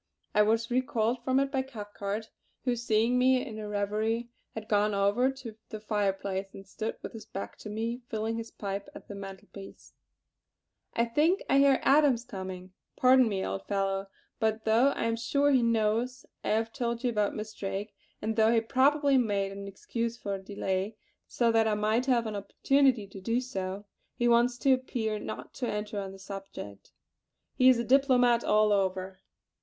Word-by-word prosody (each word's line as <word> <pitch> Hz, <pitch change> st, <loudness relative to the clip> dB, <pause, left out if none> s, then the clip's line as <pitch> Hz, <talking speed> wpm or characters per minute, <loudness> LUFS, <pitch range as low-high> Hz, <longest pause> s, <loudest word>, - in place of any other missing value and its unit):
I 210 Hz, -, +5 dB
was 225 Hz, +2 st, +2 dB
recalled 245 Hz, -2 st, 0 dB
from 260 Hz, +1 st, +2 dB
it 275 Hz, 0 st, 0 dB
by 265 Hz, -2 st, +1 dB
Cathcart, 210 Hz, -4 st, -6 dB, 0.3 s
who 250 Hz, -2 st, +2 dB
seeing 230 Hz, +1 st, +2 dB
me 255 Hz, +1 st, +3 dB
in 220 Hz, -5 st, -7 dB
a 210 Hz, -, -5 dB
reverie 215 Hz, +3 st, -1 dB, 0.3 s
had 220 Hz, -1 st, -6 dB
gone 210 Hz, 0 st, +2 dB
over 200 Hz, +6 st, +3 dB
to 250 Hz, -5 st, -9 dB
the 215 Hz, -, -6 dB
fireplace 200 Hz, -2 st, -1 dB
and 195 Hz, -, -10 dB
stood 215 Hz, +3 st, -5 dB
with -, -, -6 dB
his 220 Hz, -1 st, -10 dB
back 195 Hz, -, -6 dB
to 215 Hz, -, -8 dB
me, 230 Hz, +3 st, -3 dB
filling 220 Hz, 0 st, -2 dB
his 230 Hz, 0 st, -5 dB
pipe 200 Hz, 0 st, -5 dB
at -, -, -11 dB
the -, -, -7 dB
mantel 195 Hz, 0 st, -9 dB
piece: 195 Hz, -1 st, -12 dB, 1.0 s
"I 235 Hz, -, +3 dB
think 305 Hz, -, +2 dB
I 275 Hz, -, +4 dB
hear 275 Hz, -1 st, +5 dB
Adams 275 Hz, -4 st, +4 dB
coming. 185 Hz, -4 st, -7 dB, 0.2 s
Pardon 255 Hz, -2 st, +5 dB
me, 190 Hz, -2 st, -2 dB
old 195 Hz, -, -4 dB
fellow, 195 Hz, -1 st, -1 dB, 0.3 s
but 220 Hz, -1 st, 0 dB
though 225 Hz, +4 st, +4 dB
I 280 Hz, -, 0 dB
am 230 Hz, 0 st, +1 dB
sure 280 Hz, +5 st, +2 dB
he 260 Hz, -3 st, +4 dB
knows 230 Hz, +3 st, 0 dB, 0.2 s
I -, -, -2 dB
have 225 Hz, +1 st, 0 dB
told 235 Hz, 0 st, -2 dB
you 245 Hz, -, +1 dB
about 210 Hz, -2 st, 0 dB
Miss 215 Hz, 0 st, -6 dB
Drake, 200 Hz, +2 st, -4 dB, 0.3 s
and 220 Hz, +1 st, -1 dB
though 220 Hz, 0 st, +4 dB
he 230 Hz, -, +4 dB
probably 275 Hz, +4 st, +3 dB
made 200 Hz, -4 st, 0 dB
an 200 Hz, 0 st, -7 dB
excuse 230 Hz, +4 st, -4 dB
for 200 Hz, -3 st, -3 dB
delay 195 Hz, +1 st, -3 dB, 0.3 s
so 235 Hz, -1 st, +1 dB
that 225 Hz, -1 st, +3 dB
I 215 Hz, -, +2 dB
might 215 Hz, +5 st, +1 dB
have 240 Hz, -3 st, +3 dB
an 215 Hz, -1 st, -4 dB
opportunity 250 Hz, +3 st, +2 dB
to 195 Hz, 0 st, -11 dB
do 230 Hz, +5 st, 0 dB
so, 195 Hz, -5 st, -5 dB, 0.3 s
he 240 Hz, -, +1 dB
wants 240 Hz, +1 st, +4 dB
to 265 Hz, +2 st, +4 dB
appear 230 Hz, -4 st, -2 dB
not -, -, -7 dB
to 250 Hz, -, -3 dB
enter 210 Hz, 0 st, -3 dB
on 195 Hz, -1 st, -5 dB
the 195 Hz, -, -11 dB
subject. 195 Hz, -, -9 dB, 0.6 s
He 255 Hz, 0 st, +5 dB
is 235 Hz, -2 st, +3 dB
diplomat 250 Hz, -3 st, +4 dB
all 215 Hz, 0 st, +3 dB
over. 190 Hz, -1 st, 0 dB
220 Hz, 185 wpm, -29 LUFS, 200-245 Hz, 1.0 s, I